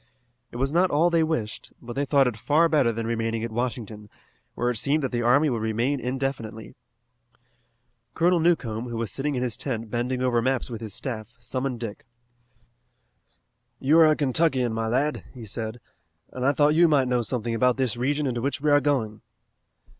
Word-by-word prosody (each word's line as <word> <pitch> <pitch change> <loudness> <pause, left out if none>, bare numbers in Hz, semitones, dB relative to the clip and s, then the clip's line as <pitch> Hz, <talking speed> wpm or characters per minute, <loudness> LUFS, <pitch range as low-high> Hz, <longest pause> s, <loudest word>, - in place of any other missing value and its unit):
It - - -13
was 135 +4 -1
not 180 +2 +3
all 165 +4 +3
they 165 -1 +3
wished, 155 -10 -2
but 120 -1 -8
they 140 +3 -1
thought 140 -1 +4
it 120 - -2
far 150 +9 +3
better 145 -7 +3
than 115 0 -4
remaining 115 0 -2
at 115 - -4
Washington, 110 -3 -4 0.5
where 120 +1 0
it 120 - -3
seemed 145 +7 +1
that 135 - -1
the 120 -1 -1
army 130 +6 +4
would 120 -6 -1
remain 115 +6 0
indefinitely. 125 -4 -4 1.4
Colonel 175 +1 +3
Newcomb, 125 -9 0
who 115 - -4
was 115 -4 -3
sitting 140 +4 -2
in 125 - -1
his 120 -4 -2
tent 115 -5 -4
bending 125 +2 -1
over 120 -2 +2
maps 130 0 -1
with 115 -1 -6
his 110 -3 -7
staff, 120 -2 -6
summoned 125 +1 -4
Dick. 110 -2 -7 1.7
"You 150 +5 +4
are 160 - +8
a 155 - +4
Kentuckian, 135 -4 +1
my 115 0 -2
lad," 135 +6 0
he 120 -3 -8
said, 110 +2 -5 0.5
"and 130 +1 -1
I 140 - +4
thought 145 +1 +3
you 170 +2 +5
might 140 -5 +3
know 125 -1 +1
something 120 0 -2
about 125 +2 +2
this 130 -4 0
region 145 +5 0
into 120 -3 -2
which 140 +3 -1
we 150 +1 +1
are 145 0 +5
going." 125 -7 -1
125 Hz, 190 wpm, -25 LUFS, 115-145 Hz, 1.7 s, are